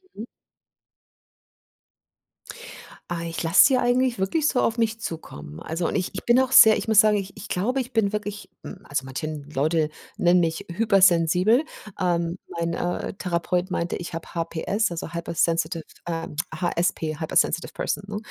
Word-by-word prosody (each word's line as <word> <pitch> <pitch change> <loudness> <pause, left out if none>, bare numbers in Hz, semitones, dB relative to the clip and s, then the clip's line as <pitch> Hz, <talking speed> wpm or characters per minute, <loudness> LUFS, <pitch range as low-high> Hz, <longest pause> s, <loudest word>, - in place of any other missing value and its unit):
Mhm. 215 - -7 2.9
Ah, 170 -1 -4
ich 165 +1 -4
lass 165 +3 +6
sie 265 -2 +4
eigentlich 250 -1 +1
wirklich 290 +11 +1
so 250 - +1
auf 230 - 0
mich 225 -1 -1
zukommen. 75 - -7
Also 165 +2 -3
und - - -1
ich 180 - -2
ich - - -6
bin 240 +1 +4
auch 260 0 +1
sehr 220 -1 +9
ich - - -5
muss 220 -2 +7
sagen, 215 -1 +3
ich 195 -1 -6
ich 205 - -10
glaube, 250 +9 0
ich 250 0 -8
bin 220 -4 +1
wirklich 210 -1 -5
hm, 195 0 -10
also 140 -2 -2
manchen 145 +2 -6
Leute 155 +2 0 0.3
nennen 175 +1 +3
mich 165 -1 -1
hypersensibel. 190 - +3 0.3
Ähm, 170 -1 0
mein, 170 0 -3
äh, - - -3
mein, 175 0 -2
äh, - - -6
Therapeut 180 0 -1
meinte, 170 -2 -2
ich 175 - -7
hab 165 0 -6
HPS, 175 +5 -1
also 165 -1 -5
hypersensitive 165 -1 -1 0.2
ähm, 165 -3 -4 0.2
HSP, 165 -2 -1
hyper 160 - -5
sensitive 170 - +1
person, 200 - -3
ne? 205 0 -5
175 Hz, 170 wpm, -24 LUFS, 165-215 Hz, 2.9 s, sehr